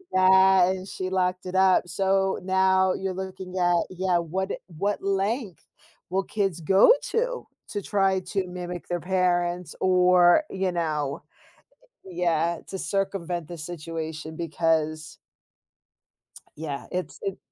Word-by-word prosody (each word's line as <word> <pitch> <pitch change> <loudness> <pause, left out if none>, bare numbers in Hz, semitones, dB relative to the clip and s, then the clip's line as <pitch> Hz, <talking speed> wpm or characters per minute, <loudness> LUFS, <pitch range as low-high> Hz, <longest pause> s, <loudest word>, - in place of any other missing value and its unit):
Yeah, 190 0 +6
and 190 0 -5
she 185 -1 -4
locked 185 -1 -1
it 180 - -5
up, 190 -1 +4
so, 195 +2 +1
now 190 0 +3
you're 190 0 -3
looking 190 0 -6
at 175 -1 +3
yeah, 185 -1 +1
what 185 +4 -3 0.2
what 195 +4 -3
length 200 +1 -2 0.5
will 190 +1 +1
kids 195 -5 -2
go 190 - +6 0.2
to - - -1 0.2
to 205 - -3
try 195 -1 +1
to 185 +1 -2
mimic 180 -1 -6
their 175 0 -2
parents 180 -1 0
or 180 - +5
you 190 -1 -1
know 155 -5 -2 0.8
yeah, 170 -2 0
to 190 - -5
circumvent 185 -4 -2
the 175 -1 -8
situation 160 -1 -6
because 160 -1 -1 1.4
Yeah, 145 -3 -5
it's 180 - -4
it 395 -2 -3
185 Hz, 125 wpm, -25 LUFS, 170-190 Hz, 1.4 s, Yeah